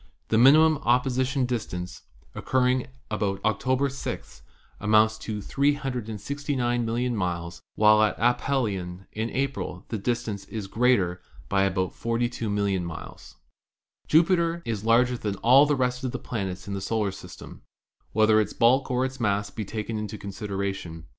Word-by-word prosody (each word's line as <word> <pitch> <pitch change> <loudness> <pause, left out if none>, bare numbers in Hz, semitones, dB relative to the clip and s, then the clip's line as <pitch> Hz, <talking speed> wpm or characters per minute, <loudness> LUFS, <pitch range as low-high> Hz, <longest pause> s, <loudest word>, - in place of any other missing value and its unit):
The 110 - +3
minimum 155 +4 +6
opposi 125 +1 +1
tion 135 -1 0
distance, 100 -7 -4 0.3
occurring 130 -1 +1 0.2
about 100 -2 -1
October 130 +5 +1
6, 140 0 -6 0.4
amounts 110 +1 +3
to 105 -2 -5
369, 130 -2 -1
000,000 120 +2 -1
miles, 85 -3 -3
while 105 0 +5
at 110 - +2
aphelion 105 -7 0
in 110 +2 -3
April 135 -9 -3
the 110 - -3
distance 115 -2 -2
is 110 -3 -6
greater 100 -5 +1 0.3
by 95 -1 +3
about 95 -1 0
42,000,000 110 -5 -1
miles. 85 -2 -9 0.7
Jupiter 170 +1 +3
is 110 -3 -3
larger 120 +2 +3
than 105 -2 -2
all 130 +8 +6
the 145 - +2
rest 125 -1 -1
of 130 - -2
the - - -3
planets 95 -6 -5
in 100 - -4
the 100 - -3
solar 105 0 -1
system, 90 -2 -11 0.5
whether 110 0 +4
its 105 - -3
bulk 130 +3 +3
or 125 0 +1
its 130 0 -6
mass 100 -2 0
be 110 - -4
taken 110 +2 -4
into 105 0 -5
consideration. 95 -4 -5
110 Hz, 145 wpm, -26 LUFS, 100-125 Hz, 0.7 s, minimum